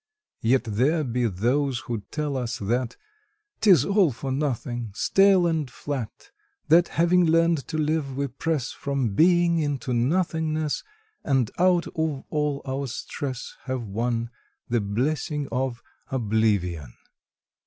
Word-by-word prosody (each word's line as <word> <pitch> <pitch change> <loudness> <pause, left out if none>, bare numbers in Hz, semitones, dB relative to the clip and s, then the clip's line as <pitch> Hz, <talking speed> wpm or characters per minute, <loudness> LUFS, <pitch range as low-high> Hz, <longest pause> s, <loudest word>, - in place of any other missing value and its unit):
Yet 125 +2 +3
there 130 +9 +1
be 125 -2 0
those 125 +6 0
who 115 -4 -4
tell 150 -2 -2
us 120 -2 -2
that 120 +4 -2 0.6
Tis 180 - +5
all 195 -6 +3
for 130 +3 -5
nothing, 120 -5 -2
stale 195 - +4
and 160 -5 0
flat; 130 -3 -6 0.4
That, 170 +2 +6
having 175 +2 +3
learned 165 -2 +2
to 155 - -3
live, 150 -3 -1
we 140 - 0
press 140 0 -2
From 135 -7 -2
Being 170 - +4
into 145 -4 -2
Nothingness, 155 +3 0 0.4
And 135 -6 +1
out 180 -1 +4
of 160 -4 -2
all 150 -2 -1
our 135 +1 -2
stress 130 +2 -5
have 130 -2 -3
won 115 +3 -2 0.4
The 120 -1 +1
blessing 140 +7 -1
of 125 -1 -2 0.3
Oblivion! 100 - 0
135 Hz, 130 wpm, -25 LUFS, 120-155 Hz, 0.6 s, That